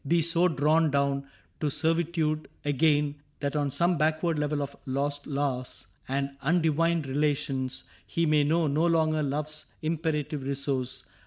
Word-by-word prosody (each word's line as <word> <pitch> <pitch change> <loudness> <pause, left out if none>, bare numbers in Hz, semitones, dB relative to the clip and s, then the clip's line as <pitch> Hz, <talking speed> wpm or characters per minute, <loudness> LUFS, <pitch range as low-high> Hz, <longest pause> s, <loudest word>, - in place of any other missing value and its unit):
Be 170 +1 +3
so 170 +2 +3
drawn 155 +1 +3
down 140 -1 0 0.3
to 150 - 0
servitude 160 0 0 0.2
again 145 0 +2 0.2
That 140 0 -2
on 145 -1 +1
some 170 +3 +1
backward 160 +1 +1
level 150 0 0
of 140 0 -7
lost 140 +2 -1
laws 135 -3 -2 0.2
And 140 +1 -2
undivined 165 0 +2
relations, 135 -2 -1 0.2
he 170 - 0
may 150 -1 +4
know 160 +3 +2
No 155 +3 +2
longer 160 -2 +2
Love's 150 +2 -3 0.2
imperative 155 -2 -1
resource. 135 -1 -2
150 Hz, 140 wpm, -28 LUFS, 140-160 Hz, 0.3 s, may